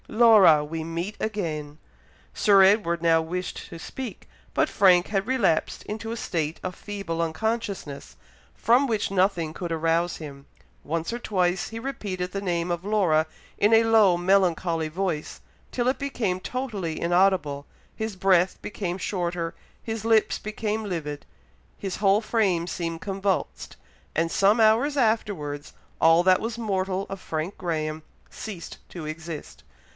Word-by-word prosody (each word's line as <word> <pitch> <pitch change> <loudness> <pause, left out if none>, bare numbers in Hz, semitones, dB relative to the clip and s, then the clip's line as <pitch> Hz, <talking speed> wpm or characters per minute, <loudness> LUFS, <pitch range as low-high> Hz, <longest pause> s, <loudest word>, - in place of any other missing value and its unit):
"Laura! 215 -10 +6
we 160 +1 -4
meet 170 +6 -4
again." 155 -9 -3 0.6
Sir 200 -2 +5
Edward 190 -4 +3
now 165 -1 +4
wished 180 +3 -5
to - - -8
speak, 245 +5 -7 0.3
but - - +2
Frank 180 -2 +4
had 195 -1 -1
relapsed 220 -11 +1
into 220 +1 -5
a 230 - -4
state 160 -6 -2
of 185 0 -4
feeble 195 -5 -4
unconsciousness, 170 - -3 0.4
from 245 +5 +3
which 215 -5 -1
nothing 185 -5 +1
could 175 0 -5
arouse 165 +2 +1
him; 140 -3 -10 0.4
once 165 +7 -2
or 240 - -3
twice 185 -5 0
he 225 - -6
repeated 195 -8 -4
the 195 - -3
name 175 -2 -1
of 175 0 -2
Laura 185 -7 +2 0.3
in 210 +2 +4
a 225 - +6
low 220 -6 +5
melancholy 175 -3 +2
voice, 170 -2 -3 0.3
till 245 -1 -1
it 255 0 +1
became 235 -10 -1
totally 210 -12 -4
inaudible 175 -5 +2 0.3
his 220 -2 -4
breath 185 -1 +3
became 190 -4 -4
shorter 175 -3 -2 0.3
his 225 -2 -4
lips 225 -1 +3
became 215 +1 -3
livid 155 -7 -4 0.5
his 195 -2 -4
whole 200 +1 +3
frame 200 -7 +1
seemed 165 -2 -3
convulsed 190 - -2 0.4
and 165 +1 +1
some 205 +4 +3
hours 230 +7 +4
afterwards, 200 - -1 0.3
all 165 +1 +6
that 185 0 +4
was 230 0 -3
mortal 195 -3 -1
of 195 -1 -7
Frank 160 +4 -4
Graham 155 -3 -2 0.3
ceased 195 -6 -8
to 170 -3 -7
exist. 160 0 -7
185 Hz, 145 wpm, -25 LUFS, 165-215 Hz, 0.6 s, Laura